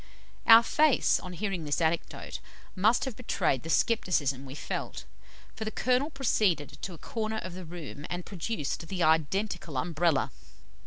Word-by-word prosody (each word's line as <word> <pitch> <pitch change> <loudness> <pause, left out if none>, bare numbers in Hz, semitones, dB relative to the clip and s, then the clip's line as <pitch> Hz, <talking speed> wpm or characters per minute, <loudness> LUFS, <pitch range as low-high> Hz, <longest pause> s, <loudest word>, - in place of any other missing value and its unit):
Our 230 0 +10
face, 300 +3 +3
on 180 - -8
hearing 190 -2 -3
this 145 -1 0
anecdote, 165 0 -2 0.4
must 215 +8 +3
have 260 -4 -4
betrayed 180 - 0
the 165 - -8
scepticism 145 - +1
we 135 - -8
felt, - - -5 0.5
for 220 - -4
the 215 - -2
Colonel 255 +5 +1
proceeded 195 - 0
to 185 - -5
a - - -12
corner 220 +4 -3
of 185 -4 -5
the 185 0 -8
room, 160 -3 -8
and 175 0 -4
produced 170 -4 -4
the 180 -1 -1
identical 160 0 +1
Umbrella. 160 +1 +1
180 Hz, 155 wpm, -29 LUFS, 160-220 Hz, 0.5 s, Our